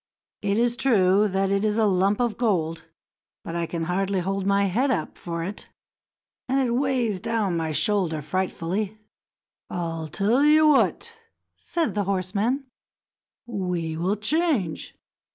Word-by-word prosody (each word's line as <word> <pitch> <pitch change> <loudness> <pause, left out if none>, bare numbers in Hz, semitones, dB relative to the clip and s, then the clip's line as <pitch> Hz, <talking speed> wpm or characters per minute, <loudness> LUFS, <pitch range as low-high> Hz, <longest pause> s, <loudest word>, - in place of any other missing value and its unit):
It 205 0 0
is 240 +1 +2
true 205 -5 +3
that 195 0 0
it 200 +1 +1
is 215 0 +1
a 220 - +3
lump 195 +2 +2
of 240 -3 0
gold, 165 -10 -1 0.6
but 165 - -6
I 170 -1 -1
can 165 -1 -3
hardly 190 +3 0
hold 195 +2 -2
my 200 0 +3
head 235 +9 +1
up 255 - -1
for 170 -1 -5
it, 195 +4 -6 0.8
and 270 +1 +2
it 255 -3 +1
weighs 245 -5 0
down 220 -4 -1
my 160 -1 -1
shoulder 160 0 +1
frightfully." 185 +5 -2 0.7
"I'll 165 -2 -3
tell 215 - +1
you 305 +1 +6
what," 295 -3 +2 0.5
said 335 -2 -1
the 205 -2 -1
horseman, 200 +8 -1 0.8
"we 180 -7 -3
will 180 +5 0
change. 225 - -1
200 Hz, 145 wpm, -25 LUFS, 180-230 Hz, 0.8 s, you